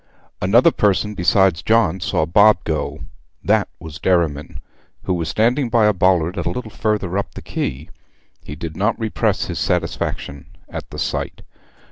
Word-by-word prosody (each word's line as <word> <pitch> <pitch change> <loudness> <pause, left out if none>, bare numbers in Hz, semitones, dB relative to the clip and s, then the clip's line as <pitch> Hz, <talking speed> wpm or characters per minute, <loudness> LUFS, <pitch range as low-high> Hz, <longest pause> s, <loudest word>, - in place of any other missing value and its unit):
Another 120 - +5
person 105 -2 +1
besides 95 -3 +2
John 110 -6 +2
saw 80 - 0
Bob 100 +2 +4
go. 75 -2 -3 0.4
That 105 0 +2
was 80 -1 -10
Derriman, 85 -6 0 0.4
who 95 - -1
was 85 -3 -2
standing 120 - +1
by 115 -2 +3
a 105 - +4
bollard 90 -1 +2
a 85 - -1
little 125 -3 -5
further 100 -4 -1
up 100 - -6
the - - -7
quay. 70 +5 -4 0.6
He 75 - -8
did 80 0 -6
not 105 +5 0
repress 110 -2 0
his - - -4
satisfaction 70 0 -2 0.2
at - - -7
the - - -9
sight. - - -3
95 Hz, 155 wpm, -20 LUFS, 80-105 Hz, 0.6 s, Another